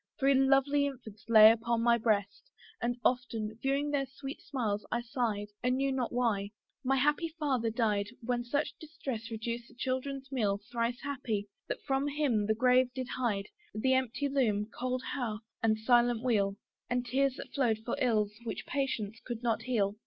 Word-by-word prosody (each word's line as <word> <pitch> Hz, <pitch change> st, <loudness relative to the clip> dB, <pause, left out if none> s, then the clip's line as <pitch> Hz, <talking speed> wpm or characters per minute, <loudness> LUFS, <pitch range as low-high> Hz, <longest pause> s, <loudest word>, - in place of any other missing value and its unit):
Three 275 Hz, 0 st, +4 dB
lovely 275 Hz, +2 st, +4 dB
infants 220 Hz, -6 st, -9 dB
lay 220 Hz, -1 st, +10 dB
upon 230 Hz, 0 st, 0 dB
my 235 Hz, 0 st, +4 dB
breast; 205 Hz, -3 st, 0 dB, 0.3 s
And 240 Hz, +1 st, 0 dB
often, 230 Hz, -4 st, 0 dB
viewing 280 Hz, +2 st, 0 dB
their 275 Hz, -2 st, 0 dB
sweet 270 Hz, +1 st, -8 dB
smiles, 220 Hz, -7 st, -2 dB
I 240 Hz, -, 0 dB
sighed, 230 Hz, -5 st, -2 dB
And 250 Hz, +1 st, +1 dB
knew 275 Hz, 0 st, +1 dB
not 255 Hz, -3 st, -1 dB
why. 225 Hz, -5 st, 0 dB, 0.3 s
My 270 Hz, +1 st, +2 dB
happy 295 Hz, +5 st, +2 dB
father 260 Hz, -7 st, +1 dB
died 215 Hz, -3 st, +1 dB, 0.2 s
When 240 Hz, 0 st, 0 dB
sad 285 Hz, +5 st, 0 dB
distress 270 Hz, -8 st, -6 dB
reduced 235 Hz, +1 st, -4 dB
the 245 Hz, -, -19 dB
children's 265 Hz, +1 st, -3 dB
meal: 205 Hz, -6 st, +1 dB
Thrice 235 Hz, 0 st, -1 dB
happy! 240 Hz, -8 st, -3 dB, 0.2 s
that -, -, -4 dB
from 275 Hz, 0 st, 0 dB
him 280 Hz, -8 st, +1 dB
the 220 Hz, -, +2 dB
grave 250 Hz, +1 st, +4 dB
did 260 Hz, -1 st, -4 dB
hide 210 Hz, -6 st, -1 dB, 0.3 s
The 260 Hz, +5 st, +2 dB
empty 260 Hz, +2 st, 0 dB
loom, 225 Hz, -6 st, +1 dB
cold 255 Hz, 0 st, -2 dB
hearth, 230 Hz, -6 st, -3 dB, 0.2 s
and 220 Hz, -1 st, +3 dB
silent 240 Hz, 0 st, +3 dB
wheel, 200 Hz, -6 st, +2 dB, 0.3 s
And 245 Hz, 0 st, 0 dB
tears 270 Hz, +1 st, +1 dB
that -, -, -9 dB
flowed 240 Hz, -6 st, +2 dB
for 240 Hz, -, -1 dB
ills 215 Hz, -4 st, +2 dB
which 230 Hz, -, -5 dB
patience 235 Hz, -6 st, -2 dB
could 240 Hz, -1 st, -5 dB
not 225 Hz, -2 st, +1 dB
heal. 215 Hz, -4 st, 0 dB
245 Hz, 175 wpm, -31 LUFS, 220-270 Hz, 0.3 s, lay